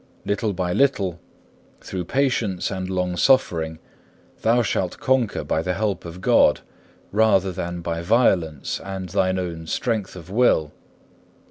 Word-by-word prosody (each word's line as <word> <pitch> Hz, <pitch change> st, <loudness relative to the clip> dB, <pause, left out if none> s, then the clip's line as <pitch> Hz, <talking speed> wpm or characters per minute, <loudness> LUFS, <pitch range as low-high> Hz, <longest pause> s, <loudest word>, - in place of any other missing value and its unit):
Little 105 Hz, +1 st, 0 dB
by 90 Hz, -1 st, -2 dB
little, 100 Hz, -11 st, +1 dB, 0.6 s
through 90 Hz, -2 st, -5 dB
patience 120 Hz, -7 st, 0 dB
and 95 Hz, -1 st, -4 dB
longsuffering, 90 Hz, -3 st, +1 dB, 0.6 s
thou 120 Hz, +2 st, +3 dB
shalt 95 Hz, -3 st, -1 dB
conquer 130 Hz, -4 st, +1 dB
by 80 Hz, -, 0 dB
the 90 Hz, +2 st, -2 dB
help 100 Hz, -4 st, -2 dB
of 85 Hz, +2 st, -8 dB
God, -, -, +4 dB, 0.5 s
rather 100 Hz, -3 st, +3 dB
than 85 Hz, 0 st, -4 dB
by 85 Hz, 0 st, -3 dB
violence 85 Hz, -, +1 dB
and 95 Hz, -1 st, -5 dB
thine 95 Hz, 0 st, +1 dB
own 85 Hz, -3 st, -4 dB
strength 110 Hz, -5 st, -2 dB
of 90 Hz, 0 st, -10 dB
will. 100 Hz, -9 st, +3 dB
95 Hz, 130 wpm, -23 LUFS, 85-110 Hz, 0.6 s, God